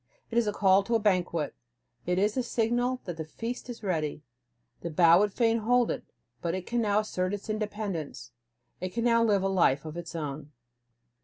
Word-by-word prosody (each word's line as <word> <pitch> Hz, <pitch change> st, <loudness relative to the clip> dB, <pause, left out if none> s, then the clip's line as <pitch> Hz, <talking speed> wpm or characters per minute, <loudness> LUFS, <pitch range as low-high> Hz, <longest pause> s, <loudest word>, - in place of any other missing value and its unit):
It 230 Hz, -, -1 dB
is 230 Hz, -, 0 dB
a -, -, +2 dB
call 195 Hz, -1 st, +4 dB
to 230 Hz, -, +1 dB
a -, -, +4 dB
banquet, 180 Hz, -7 st, 0 dB, 0.5 s
it 180 Hz, 0 st, +1 dB
is 205 Hz, +2 st, +2 dB
a 260 Hz, -, +1 dB
signal 245 Hz, +2 st, 0 dB
that 175 Hz, -4 st, -5 dB
the 160 Hz, -, -3 dB
feast 230 Hz, +11 st, -6 dB
is 235 Hz, -2 st, -7 dB
ready. 155 Hz, -5 st, -2 dB, 0.6 s
The 170 Hz, -, -4 dB
bough 170 Hz, +2 st, +6 dB
would 205 Hz, 0 st, +2 dB
fain 230 Hz, +1 st, +2 dB
hold 245 Hz, +2 st, +2 dB
it, -, -, -4 dB, 0.4 s
but 170 Hz, 0 st, -1 dB
it 185 Hz, -1 st, -5 dB
can 240 Hz, 0 st, 0 dB
now 210 Hz, -1 st, +2 dB
assert 185 Hz, -2 st, -2 dB
its 205 Hz, +2 st, -6 dB
independence; 205 Hz, -, -4 dB, 0.5 s
it 185 Hz, +1 st, -5 dB
can 235 Hz, -, 0 dB
now 230 Hz, -1 st, +4 dB
live 205 Hz, -4 st, +3 dB
a -, -, +2 dB
life 165 Hz, -7 st, +2 dB
of 155 Hz, +1 st, -6 dB
its 170 Hz, -1 st, -7 dB
own. 150 Hz, -1 st, -5 dB
200 Hz, 205 wpm, -28 LUFS, 170-230 Hz, 0.6 s, bough